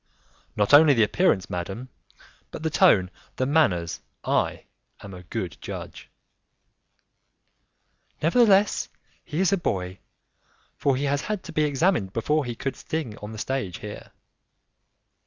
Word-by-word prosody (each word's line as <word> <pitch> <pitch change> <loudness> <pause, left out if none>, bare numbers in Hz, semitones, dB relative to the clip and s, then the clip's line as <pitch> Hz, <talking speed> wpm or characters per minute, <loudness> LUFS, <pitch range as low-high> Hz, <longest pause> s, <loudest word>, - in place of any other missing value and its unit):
"Not 105 +3 +1
only 145 -1 +8
the 115 - +4
appearance, 105 - +2
madam, 95 +8 -5 0.6
but - - -8
the 160 - -1
tone, 110 - +4 0.2
the 130 - 0
manners; 115 - +1 0.2
I - - 0 0.4
am 100 - -10
a 90 - -9
good 90 - -5
judge." - - -8 2.1
"Nevertheless, 200 +3 +3 0.3
he 160 0 -4
is 190 0 +3
a - - +3
boy, 95 - -3 0.8
for 140 -2 +1
he 135 - -2
has 140 0 0
had 210 -3 -4
to 165 - -9
be 155 -1 +2
examined 145 - +1
before 150 +6 0
he 120 -1 -4
could 130 +3 -4
sing 155 -9 -4
on 105 +1 -8
the 110 - -8
stage 110 -6 -3
here." 105 0 -9
135 Hz, 140 wpm, -25 LUFS, 100-160 Hz, 2.1 s, only